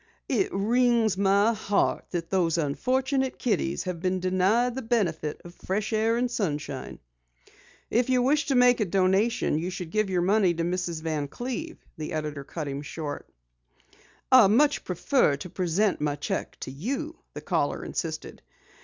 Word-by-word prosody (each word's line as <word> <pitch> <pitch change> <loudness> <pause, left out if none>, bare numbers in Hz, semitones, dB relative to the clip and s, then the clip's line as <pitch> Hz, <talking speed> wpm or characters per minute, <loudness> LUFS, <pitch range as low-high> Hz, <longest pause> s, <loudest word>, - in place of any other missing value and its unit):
It 380 - +1
wrings 230 +1 +2
my 200 +3 +3
heart 205 -2 0
that 170 -2 -4
those 175 -4 +2
unfortunate 260 - 0
kiddies 70 - -1
have 180 -2 -4
been 185 +2 0
denied 190 +7 +2
the 265 - -4
benefit 185 - -1
of 175 - -10
fresh 200 +5 -3
air 225 +2 +2
and 245 0 0
sunshine." 145 - -3 0.9
"If 240 +2 +2
you 250 -1 +3
wish 290 +4 +2
to 275 - +1
make 245 -1 +5
a 215 - +2
donation, 190 0 +2
you 175 +3 -3
should 180 -3 -6
give 215 -2 +1
your 180 -2 +1
money 190 -2 +3
to 165 - -1
Mrs. 175 -2 -2
Van 155 -3 -2
Cleve," 260 - -6
the 155 -1 -5
editor 150 -2 -3
cut 155 +1 -6
him 140 0 -4
short. 150 -1 -6 1.0
"I 255 -6 +8
much 285 +8 +3
prefer 180 - +1
to 180 - -8
present 185 +1 0
my 150 -1 0
cheque 145 - -4
to - - -5
you," 275 - -4 0.2
the - - -6
caller - - -1
insisted. - - -5
195 Hz, 165 wpm, -27 LUFS, 165-240 Hz, 1.0 s, I